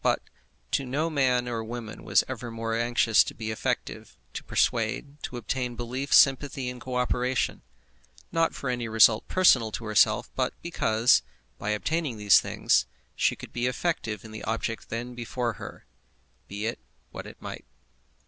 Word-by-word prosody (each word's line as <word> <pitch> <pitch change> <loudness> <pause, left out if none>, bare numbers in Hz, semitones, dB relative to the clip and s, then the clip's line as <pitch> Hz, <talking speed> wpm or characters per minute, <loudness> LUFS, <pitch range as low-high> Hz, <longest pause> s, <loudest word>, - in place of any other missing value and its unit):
But - - +3 0.6
no 140 +5 -2
man 125 -4 +2
or 115 -2 -3
woman 115 -1 -7
was - - +3
ever 120 - -5
more 115 0 -3
anxious 115 -1 +4
to - - -7
be 110 -1 -4
effective, 110 - -3 0.2
to - - -5
persuade, 125 +6 0
to 125 - -5
obtain 125 0 -3
belief, 125 +4 -4
sympathy, 135 -1 +4
and 125 -1 -10
co 130 0 -5
operation; 125 0 0 0.7
not 165 0 +1
for 130 - -3
any 120 -2 -2
result 110 0 +5
personal 130 -12 +4
to 115 - -5
herself, 105 -1 +3
but - - -1
because, 115 - +3 0.4
by 105 - -3
obtaining 140 +4 -1
these 105 -1 +6
things, - - +1 0.3
she - - +2
could - - -11
be 120 +1 0
effective 120 - -2
in 110 - -10
the 110 - -8
object 115 0 -3
then 120 +2 -4
before 120 0 -3
her, - - -9 0.6
be 105 +2 -5
it 115 - -2 0.3
what - - -8
it - - -12
might. - - -8
120 Hz, 160 wpm, -27 LUFS, 115-130 Hz, 0.7 s, these